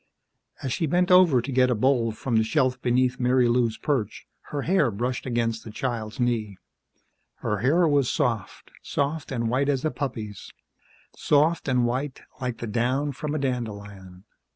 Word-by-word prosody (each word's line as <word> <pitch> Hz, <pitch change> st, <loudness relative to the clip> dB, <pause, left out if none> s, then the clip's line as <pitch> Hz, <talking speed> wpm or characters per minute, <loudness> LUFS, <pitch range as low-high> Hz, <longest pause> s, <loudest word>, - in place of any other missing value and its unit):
As 130 Hz, -3 st, -1 dB
she 160 Hz, -, -1 dB
bent 180 Hz, +4 st, +2 dB
over 175 Hz, -10 st, +6 dB
to 140 Hz, -, -4 dB
get 130 Hz, 0 st, +3 dB
a 125 Hz, -, +2 dB
bowl 120 Hz, 0 st, +2 dB
from 115 Hz, +2 st, -3 dB
the 110 Hz, -, +4 dB
shelf 130 Hz, +1 st, +1 dB
beneath 125 Hz, +1 st, +1 dB
Marilou's 125 Hz, -2 st, +2 dB
perch, 120 Hz, -8 st, -2 dB, 0.2 s
her 145 Hz, -2 st, -3 dB
hair 170 Hz, -7 st, +3 dB
brushed 125 Hz, +5 st, -3 dB
against 115 Hz, -2 st, -1 dB
the -, -, -9 dB
child's 115 Hz, 0 st, -4 dB
knee. 115 Hz, -5 st, -1 dB, 0.9 s
Her 105 Hz, -, 0 dB
hair 160 Hz, -, +3 dB
was 145 Hz, -4 st, +2 dB
soft, 120 Hz, -, -2 dB
soft 145 Hz, +1 st, -2 dB
and 115 Hz, -3 st, -1 dB
white 135 Hz, +5 st, +1 dB
as 140 Hz, 0 st, 0 dB
a 155 Hz, -, +1 dB
puppy's, 110 Hz, -8 st, -5 dB, 0.6 s
soft 155 Hz, +3 st, +2 dB
and 125 Hz, -2 st, +2 dB
white 130 Hz, +3 st, -3 dB, 0.2 s
like 125 Hz, -2 st, -2 dB
the 120 Hz, -, -5 dB
down 125 Hz, +6 st, 0 dB
from 150 Hz, +2 st, -4 dB
a -, -, +1 dB
dandelion. 100 Hz, -8 st, -5 dB
125 Hz, 165 wpm, -25 LUFS, 115-140 Hz, 0.9 s, over